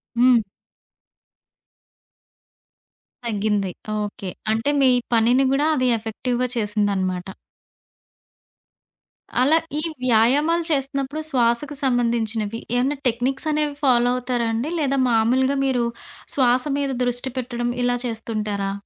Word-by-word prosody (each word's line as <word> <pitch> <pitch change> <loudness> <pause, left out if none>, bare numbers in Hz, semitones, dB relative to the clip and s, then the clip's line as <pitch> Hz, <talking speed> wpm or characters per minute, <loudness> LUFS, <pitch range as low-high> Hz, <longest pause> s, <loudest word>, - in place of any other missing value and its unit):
హ్మ్. 245 0 +5 2.9
తగ్గింది. 205 -3 -1 0.3
ఓకే. 205 -2 -5 0.2
అంటే 225 +6 0
మీ 260 - +6 0.2
పనిని 240 +4 +4
గూడా 290 +3 +2
అది 255 -2 +1
ఎఫెక్టివ్‌గా 245 +3 -2
చేసిందనమాట. 200 -4 -1 2.1
అలా 305 +5 +5 0.2
ఈ - - -1 0.2
వ్యాయామాలు 275 +9 +3
చేస్తున్నప్పుడు 275 +1 -1
శ్వాసకు 250 +3 +1
సంబంధించినవి, 230 -3 0 0.2
ఏమైనా 275 +4 0
టెక్నిక్స్ 265 +5 -1
అనేవి 300 -1 0
ఫాలో 245 -2 +4
అవుతారా 250 -2 -1
అండి? 245 +9 -2
లేదా 275 -2 0
మామూలుగా 255 +5 +2
మీరు 250 -3 +1 0.5
శ్వాస 250 -2 +4 0.2
మీద 280 -1 -1
దృష్టి 245 +1 0
పెట్టడం 240 -1 -2
ఇలా 245 0 +2
చేస్తుంటారా? 215 -3 -3
245 Hz, 100 wpm, -22 LUFS, 225-270 Hz, 2.9 s, మీ